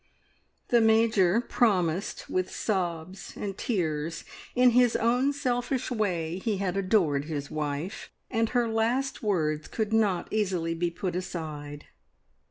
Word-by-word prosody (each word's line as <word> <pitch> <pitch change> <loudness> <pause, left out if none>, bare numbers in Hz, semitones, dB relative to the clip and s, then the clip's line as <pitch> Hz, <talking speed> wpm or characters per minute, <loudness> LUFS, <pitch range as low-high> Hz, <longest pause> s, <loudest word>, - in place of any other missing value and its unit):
The 240 -1 +5
Major 220 -3 +4
promised 190 -7 0
with 185 0 -1
sobs 185 -2 -3
and 195 -2 -4
tears. 165 -7 -2 0.3
In 250 0 +6
his 245 -1 +4
own 245 +5 +2
selfish 255 -2 -1
way 180 -7 -1
he 210 0 -1
had 190 -2 -1
adored 185 -8 +2
his 145 -3 -4
wife, 150 +4 -4 0.2
and 225 -2 +1
her 245 -2 +1
last 230 +5 0
words 155 -8 0
could 220 -1 -2
not 205 -6 +2
easily 185 -6 0
be 170 +1 -1
put 175 +1 -4
aside. 155 -5 -5
190 Hz, 130 wpm, -28 LUFS, 165-225 Hz, 0.3 s, In